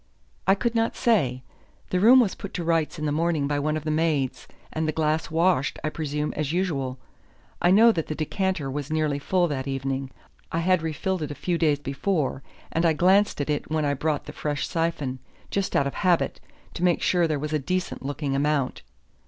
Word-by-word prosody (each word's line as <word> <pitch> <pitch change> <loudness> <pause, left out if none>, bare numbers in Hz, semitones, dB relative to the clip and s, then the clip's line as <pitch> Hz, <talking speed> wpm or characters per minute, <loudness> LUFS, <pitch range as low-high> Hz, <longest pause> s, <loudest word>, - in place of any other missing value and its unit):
"I 195 - +6
could 235 +3 -1
not 225 0 +1
say. 145 - +1 0.5
The 180 - +2
room 245 +6 +8
was 210 -6 +1
put 200 - -8
to 175 - -2
rights 165 -1 0
in 155 - -3
the 150 - 0
morning 160 -2 +1
by 145 0 0
one 155 +2 0
of 155 - -6
the 155 - -1
maids, 155 -4 0 0.3
and 160 0 -1
the - - +1
glass 155 +1 0
washed, 165 -3 +2
I 155 - 0
presume, 150 -1 -2
as 150 -1 -1
usual. 145 -8 -1 0.6
I 175 - +4
know 220 +5 +7
that 165 -7 -2
the 155 - -3
decanter 160 -2 -1
was 145 +1 -4
nearly 155 -2 0
full 175 +4 +1
that 135 -2 -3
evening; 135 0 -2 0.4
I - - -1
had 185 0 +3
refilled 165 +3 -2
it 150 - -3
a 145 - -5
few 170 +4 -1
days 150 -3 +3
before, 140 0 -1 0.3
and 165 - 0
I 165 -2 +4
glanced 185 +2 +3
at 145 - -3
it 145 - -2
when 155 -1 0
I 145 - +1
brought 150 +1 -1
the - - -8
fresh 145 -2 -2
syphon, 165 -6 -2 0.3
just 200 -1 -1
out 140 - +3
of 140 - -2
habit, 180 -3 +1 0.3
to 175 - -4
make 175 -2 +2
sure 175 -2 +3
there 155 -2 0
was 150 +2 -4
a 155 - +2
decent 185 +5 -2
looking 140 0 -2
amount." 145 -1 0
155 Hz, 210 wpm, -25 LUFS, 145-175 Hz, 0.6 s, room